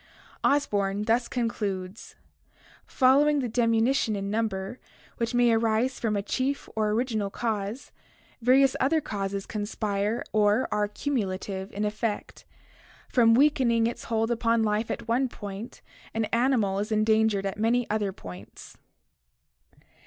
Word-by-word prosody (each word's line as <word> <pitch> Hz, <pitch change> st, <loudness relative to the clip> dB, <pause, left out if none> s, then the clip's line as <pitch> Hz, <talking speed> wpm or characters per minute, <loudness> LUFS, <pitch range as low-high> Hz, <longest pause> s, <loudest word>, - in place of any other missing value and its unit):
Osborn 205 Hz, -8 st, +1 dB
thus 230 Hz, +2 st, +1 dB
concludes: 205 Hz, -5 st, -4 dB, 0.7 s
"Following 285 Hz, +3 st, +4 dB
the 265 Hz, -3 st, 0 dB
diminution 230 Hz, 0 st, +2 dB
in 200 Hz, 0 st, -3 dB
number 215 Hz, 0 st, -2 dB, 0.4 s
which 230 Hz, +1 st, -2 dB
may 240 Hz, -1 st, +4 dB
arise 225 Hz, +3 st, +1 dB
from 220 Hz, -3 st, 0 dB
a 200 Hz, -, -1 dB
chief 265 Hz, +6 st, -2 dB
or 215 Hz, -1 st, +1 dB
original 220 Hz, -2 st, -1 dB
cause, 215 Hz, +2 st, -3 dB, 0.5 s
various 260 Hz, +3 st, +4 dB
other 315 Hz, +5 st, +2 dB
causes 200 Hz, -7 st, -4 dB
conspire 210 Hz, +1 st, -2 dB
or 210 Hz, +3 st, +3 dB
are 210 Hz, 0 st, +1 dB
cumulative 195 Hz, -5 st, -3 dB
in 210 Hz, +1 st, -2 dB
effect. 210 Hz, 0 st, -3 dB, 0.6 s
From 230 Hz, -2 st, +5 dB
weakening 255 Hz, -5 st, +3 dB
its 235 Hz, -, -3 dB
hold 225 Hz, 0 st, 0 dB
upon 230 Hz, -1 st, +2 dB
life 215 Hz, +1 st, 0 dB
at 235 Hz, -1 st, -4 dB
one 250 Hz, +3 st, +1 dB
point 205 Hz, +1 st, -8 dB, 0.3 s
an 225 Hz, 0 st, +1 dB
animal 230 Hz, -5 st, +2 dB
is 210 Hz, +2 st, -3 dB
endangered 215 Hz, -1 st, +2 dB
at 195 Hz, +1 st, -3 dB
many 235 Hz, +2 st, +2 dB
other 210 Hz, -2 st, 0 dB
points." 95 Hz, -, -11 dB
225 Hz, 130 wpm, -27 LUFS, 205-240 Hz, 0.7 s, From